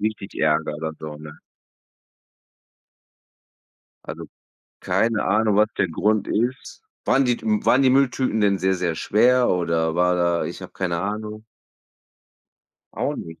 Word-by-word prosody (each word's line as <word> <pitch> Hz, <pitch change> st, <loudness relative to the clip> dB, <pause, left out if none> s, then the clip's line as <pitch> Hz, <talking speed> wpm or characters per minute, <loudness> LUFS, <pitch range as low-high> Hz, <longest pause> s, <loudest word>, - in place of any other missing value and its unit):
richtig 105 Hz, -2 st, -4 dB
ärgere 75 Hz, 0 st, 0 dB
so, 75 Hz, -1 st, -7 dB
ne? 75 Hz, 0 st, -11 dB, 2.7 s
Also, -, -, -7 dB, 0.6 s
keine 115 Hz, -2 st, 0 dB
Ahnung, 105 Hz, +1 st, +2 dB
was 105 Hz, +1 st, +4 dB
der 100 Hz, -, +2 dB
Grund 105 Hz, +5 st, 0 dB
ist. 125 Hz, -, -2 dB, 0.2 s
Waren 135 Hz, -, +3 dB
die 120 Hz, -2 st, 0 dB
m 105 Hz, -1 st, -1 dB
waren 130 Hz, -, +4 dB
die 130 Hz, -, +5 dB
Mülltüten 130 Hz, -3 st, +1 dB
denn 100 Hz, -1 st, +3 dB
sehr, 95 Hz, 0 st, +1 dB
sehr 90 Hz, -3 st, -2 dB
schwer 125 Hz, +8 st, +3 dB
oder 85 Hz, -2 st, 0 dB
war 90 Hz, +1 st, +2 dB
da 85 Hz, -1 st, +1 dB
ich -, -, -7 dB
habe -, -, -10 dB
keine 85 Hz, -3 st, -2 dB
Ahnung. 105 Hz, +3 st, -5 dB, 1.5 s
Auch -, -, -2 dB
nicht? 80 Hz, -1 st, -9 dB
100 Hz, 135 wpm, -22 LUFS, 85-110 Hz, 2.7 s, die